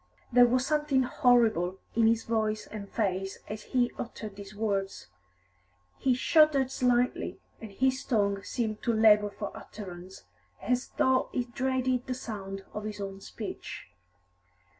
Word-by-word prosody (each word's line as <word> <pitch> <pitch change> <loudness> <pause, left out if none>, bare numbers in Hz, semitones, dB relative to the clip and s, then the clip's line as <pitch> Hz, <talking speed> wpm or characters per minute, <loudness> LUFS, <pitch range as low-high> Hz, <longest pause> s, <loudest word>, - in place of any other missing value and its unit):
There 245 0 +7
was 250 +1 +2
something 295 -3 +2
horrible 225 -8 +3 0.2
in 225 -1 +4
his 225 0 +2
voice 215 -2 -1
and 200 -2 -8
face 195 -3 -1
as 210 0 -7
he 245 -1 +1
uttered 215 -3 -6
these 200 0 -10
words; 200 -2 -2 0.9
he 260 -2 +2
shuddered 280 -1 +4
slightly, 250 -1 +1 0.2
and 220 -2 -8
his 260 +5 +1
tongue 200 -4 +1
seemed 220 -1 -3
to 235 - +1
labour 210 -2 +5
for 205 0 -6
utterance, 185 -2 -9 0.4
as 250 +3 0
though 260 0 +3
he 250 - 0
dreaded 255 +1 -1
the 255 - -2
sound 195 -5 -6
of 210 0 -5
his 210 -1 -5
own 195 -1 -6
speech. - - -7
225 Hz, 140 wpm, -29 LUFS, 200-250 Hz, 0.9 s, There